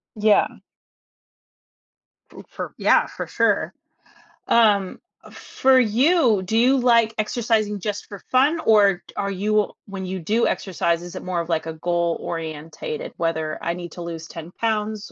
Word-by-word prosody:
Yeah. 215 0 +2 1.8
Ooh, - - -11
for - - -7
yeah, - - +4
for - - -7
sure. - - +1 0.8
Um, 205 -5 +3 0.3
for 260 0 +2
you, 245 - +3
do 220 +5 -1
you 255 +4 +4
like 235 -3 +3
exercising 215 -1 0
just 205 +1 -4
for 200 - -9
fun? 280 +6 +3
Or, 200 -4 +4
are 200 0 -2
you 210 +2 0
when 195 -1 -6
you 185 +1 -4
do 215 +8 +1
exercise, 170 -2 -1
is 175 0 -9
it - - -6
more 180 -1 -2
of 170 0 -4
like, 160 -2 0
a 160 - -5
goal-orientated, 170 - -4
whether, 160 -2 -2
"I 170 - -1
need 175 -1 -8
to 175 - -8
lose 165 -1 -6
10 165 0 -9
pounds, 215 0 -2
200 Hz, 145 wpm, -22 LUFS, 170-225 Hz, 1.8 s, yeah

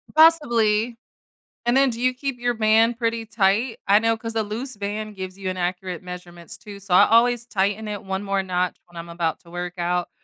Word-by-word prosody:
Possibly, 240 -8 +4 0.7
and 240 +1 +2
then 270 0 +5
do 230 -1 -5
you 255 +1 +2
keep 260 -1 -4
your 245 0 0
band 225 +1 +3
pretty 230 -1 -1
tight? 215 +3 +1
I 200 +1 +6
know 225 0 +2
'cause 225 0 -6
a 220 - +1
loose 225 +4 -6
band 210 +1 -4
gives 185 -1 -7
you 195 -1 -4
inaccurate 180 -1 -3
measurements 175 -2 -10
too, 205 -2 -11
so, 195 -2 -4
I 180 - +7
always 240 +1 +4
tighten 205 0 -1
it 205 -2 -5
1 190 0 -3
more 195 -1 0
notch 180 -1 -1
when 175 -1 -15
I'm 170 0 -7
about 170 -2 -2
to 170 - -18
work 175 0 -5
out 175 0 -1
210 Hz, 205 wpm, -23 LUFS, 185-230 Hz, 0.7 s, I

